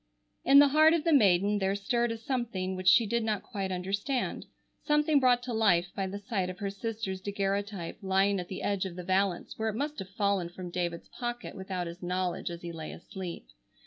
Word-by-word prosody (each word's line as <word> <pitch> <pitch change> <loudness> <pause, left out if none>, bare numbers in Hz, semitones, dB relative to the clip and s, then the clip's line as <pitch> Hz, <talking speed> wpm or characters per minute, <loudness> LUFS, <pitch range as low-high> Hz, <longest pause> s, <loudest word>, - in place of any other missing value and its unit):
In 275 +1 +6
the 285 0 +8
heart 310 +3 +6
of 325 - -1
the 330 -1 +3
maiden 205 -4 +4
there 195 0 +1
stirred 235 +4 0
a 230 - -3
something 225 -6 -2
which 185 0 -5
she 230 +5 +7
did 235 +2 0
not 215 -3 -1
quite 195 -5 -4
understand, 200 +8 -2 0.4
something 300 0 +3
brought 250 -2 +3
to 245 - -4
life 180 -6 +2
by 195 -1 -1
the 195 +2 -5
sight 200 -3 -2
of 185 - -6
her 200 -1 -3
sister's 200 -2 -4
daguerreotype 200 -2 -2
lying 195 +1 +2
at 180 - -5
the 185 - -6
edge 200 -2 0
of 180 -2 -6
the 180 - -6
valence, 190 +1 0
where 220 0 0
it 215 - -4
must 290 +5 -3
have 190 - -6
fallen 195 -3 0
from 180 0 -8
David's 175 -1 -3
pocket 240 0 -5
without 190 -2 -4
his 170 +1 -8
knowledge 180 0 -2
as 170 0 -8
he 170 - -5
lay 160 -2 -7
asleep. 180 - -7
200 Hz, 210 wpm, -30 LUFS, 185-230 Hz, 0.4 s, the